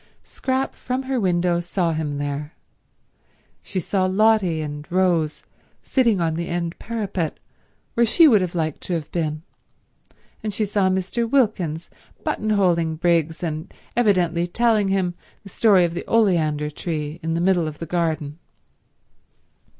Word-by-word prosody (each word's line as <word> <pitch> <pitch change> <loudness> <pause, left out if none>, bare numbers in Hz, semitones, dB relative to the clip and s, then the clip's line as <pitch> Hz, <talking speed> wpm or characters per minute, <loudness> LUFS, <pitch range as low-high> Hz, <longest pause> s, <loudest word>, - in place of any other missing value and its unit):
Scrap 260 0 -2
from 255 +1 -3
her 260 -1 -1
window 175 -3 +1
saw 175 -1 -1
him 150 -2 -2
there. 145 +2 -4 1.1
She 190 - -4
saw 185 +1 0
Lotty 195 -4 +3
and 150 +2 -6
Rose 175 -4 +1 0.4
sitting 235 -7 +2
on 165 -2 +1
the 170 +1 -3
end 170 -1 -3
parapet, 200 -8 -3 0.6
where 235 - +3
she 330 +8 +6
would 220 -8 +5
have 180 -1 -3
liked 155 -3 -2
to 180 - -4
have 160 -2 -5
been, 155 -2 -2 1.0
and 215 - -3
she 215 - +1
saw 200 -2 +1
Mr. 190 +5 -1
Wilkins 195 - 0 0.3
buttonholing 180 -7 +1
Briggs 170 -1 +1
and 155 -1 -4 0.2
evidently 180 -7 +2
telling 220 +1 +2
him 190 -2 0 0.3
the 200 - -11
story 195 -3 +4
of 170 - -3
the 175 - -5
oleander 160 -9 +2
tree 155 0 -4
in 165 0 -2
the - - 0
middle 175 -2 +2
of 150 -1 -6
the 165 - -5
garden. 160 -3 -2
175 Hz, 145 wpm, -22 LUFS, 160-205 Hz, 1.1 s, she